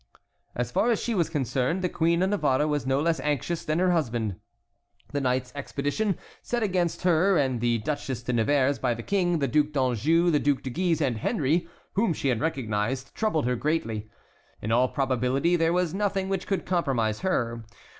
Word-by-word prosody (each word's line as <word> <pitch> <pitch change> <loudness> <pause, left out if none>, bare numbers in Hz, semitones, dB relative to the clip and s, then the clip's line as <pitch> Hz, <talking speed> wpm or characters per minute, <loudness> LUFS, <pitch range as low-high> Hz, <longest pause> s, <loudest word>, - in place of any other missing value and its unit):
As 120 0 -2
far 230 - +2
as 230 - +2
she 235 - -2
was 170 -6 +1
concerned, 140 +3 -1
the - - +3
Queen 170 +1 +1
of 190 - +1
Navarre 150 -7 +2
was 145 -3 -1
no 135 +1 +2
less 165 +2 +1
anxious 150 +3 -1
than 155 +1 -1
her 180 +1 +3
husband. 120 - 0 0.8
The 145 -1 -1
night's 125 -1 -1
expedition 145 +7 -2 0.2
sent 240 -1 -2
against 180 -5 0
her 180 +2 +4
and 130 -5 0
the 120 -1 +2
Duchesse 130 0 -3
de 125 - -2
Nevers 135 +4 +2
by 125 -2 0
the 115 - -7
King, 180 -4 +1
the 140 -3 0
Duc 150 +3 +2
d'Anjou, 145 +6 +2
the 150 - +3
Duc 145 -2 +1
de 130 - -4
Guise, 170 +2 0
and 125 -6 +1
Henry, 165 - 0 0.3
whom 200 -3 +2
she 140 - -1
had 120 -3 0
recognized, 130 -2 -2
troubled 190 - 0
her 125 0 +1
greatly. 115 -7 -2 0.5
In 110 - -4
all 125 +3 +4
probability 135 +5 +1
there 165 -1 +2
was 180 -2 +1
nothing 195 -1 -1
which 195 -1 -2
could 195 - -1
compromise 130 -12 0
her. 115 -11 -1
145 Hz, 190 wpm, -26 LUFS, 125-175 Hz, 0.8 s, her